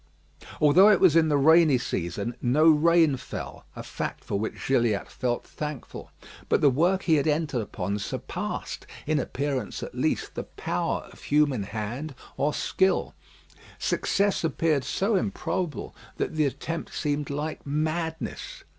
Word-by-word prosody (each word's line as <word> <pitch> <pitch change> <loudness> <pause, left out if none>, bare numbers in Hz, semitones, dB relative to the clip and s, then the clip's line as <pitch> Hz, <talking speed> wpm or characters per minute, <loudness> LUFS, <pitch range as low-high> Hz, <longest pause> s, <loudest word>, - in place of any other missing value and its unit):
Although 165 +8 +7
it 210 - +5
was 180 -5 +5
in 160 -1 +5
the 145 - +3
rainy 160 -1 +6
season 100 0 -3
no 135 +6 +3
rain 160 -2 +4
fell, - - -8
a - - -6
fact - - -5
for 100 - -2
which 110 - -4
Gilliatt 120 -6 +2
felt 120 -1 -2
thankful. 150 -4 -7 0.4
But - - +3
the 145 - +6
work 175 +8 +2
he 160 -3 +4
had 145 - +1
entered 150 -5 0
upon 100 0 -3
surpassed, 100 - -5 0.2
in 155 0 +1
appearance 135 -5 -3
at - - -7
least, - - -1
the - - -5
power - - -3
of - - -16
human 145 -5 +2
hand 110 +9 -5 0.2
or 150 - +1
skill. 190 +5 +1 0.6
Success 200 -2 +1
appeared 160 -2 +1
so 200 +3 0
improbable 185 -4 -2 0.2
that - - -2
the 155 -2 +2
attempt 165 +5 -5
seemed 145 -1 -1
like 150 +2 -4
madness. 160 - -3
150 Hz, 145 wpm, -26 LUFS, 130-165 Hz, 0.6 s, Although